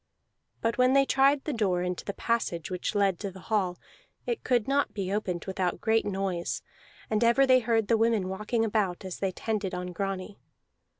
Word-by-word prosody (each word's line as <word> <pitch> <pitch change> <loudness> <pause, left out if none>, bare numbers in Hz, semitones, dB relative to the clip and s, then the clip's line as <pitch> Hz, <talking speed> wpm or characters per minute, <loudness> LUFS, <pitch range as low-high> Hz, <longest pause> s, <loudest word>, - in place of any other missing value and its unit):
But 230 +2 -1
when 255 +1 +5
they 275 0 +5
tried 275 +1 +3
the 300 - -2
door 190 -6 +1
into 180 0 -3
the 200 - -5
passage 190 -8 -1
which 180 +2 -3
led 195 -3 +2
to 200 - -3
the 190 0 -12
hall, 185 -2 -1 0.5
it 475 - -2
could 245 -4 +1
not 280 0 +1
be 195 -2 -2
opened 185 -5 -2
without 185 -2 -1
great 220 -1 +2
noise; 190 -3 -2 0.5
and 215 +1 +2
ever 235 +4 +5
they 255 -1 +6
heard 225 -3 +1
the 230 - +3
women 225 -4 +2
walking 215 +4 -1
about, 200 -4 -1
as 185 - -6
they 195 -1 0
tended 200 -1 -2
on 180 0 -5
Grani. 195 +2 -4
205 Hz, 190 wpm, -28 LUFS, 185-230 Hz, 0.5 s, they